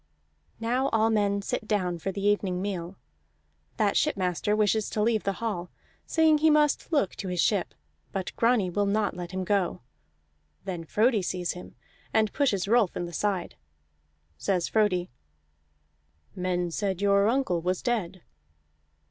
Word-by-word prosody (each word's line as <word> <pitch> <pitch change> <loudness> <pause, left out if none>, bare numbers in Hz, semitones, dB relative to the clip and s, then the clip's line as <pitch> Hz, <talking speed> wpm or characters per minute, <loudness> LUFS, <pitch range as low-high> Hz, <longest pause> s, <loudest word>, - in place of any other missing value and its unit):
Now 250 +4 0
all 225 0 +2
men 200 -2 +1
sit 240 -1 -3
down 180 -5 0
for 195 - -3
the 200 +1 -4
evening 200 -3 +1
meal. 185 -2 -4 0.8
That 210 -3 +2
shipmaster 185 +2 +1
wishes 215 0 +1
to 215 - -1
leave 220 -1 +1
the 195 - +1
hall, 180 -6 -2 0.4
saying 320 -2 +4
he 315 +1 +4
must 300 +1 +2
look 285 - +1
to 195 - -5
his 180 -1 -3
ship; 195 0 +1 0.4
but 190 -2 -4
Grani 230 -6 +2
will 205 +2 +1
not 210 0 0
let 175 -1 -6
him 190 +1 -3
go. 195 -5 0 0.8
Then 175 -3 -4
Frodi 220 +5 +2
sees 180 -1 -2
him, 180 - -10 0.4
and 220 -1 +2
pushes 205 -10 +1
Rolf 220 -3 +3
in 175 - -2
the 170 - -8
side. 195 -1 -1 0.9
Says 180 -3 0
Frodi: 185 - +1 1.2
"Men 180 -1 -1
said 190 0 -2
your 200 0 +3
uncle 230 -8 +1
was 180 +2 -1
dead." 195 -7 -2
200 Hz, 150 wpm, -27 LUFS, 180-220 Hz, 1.2 s, saying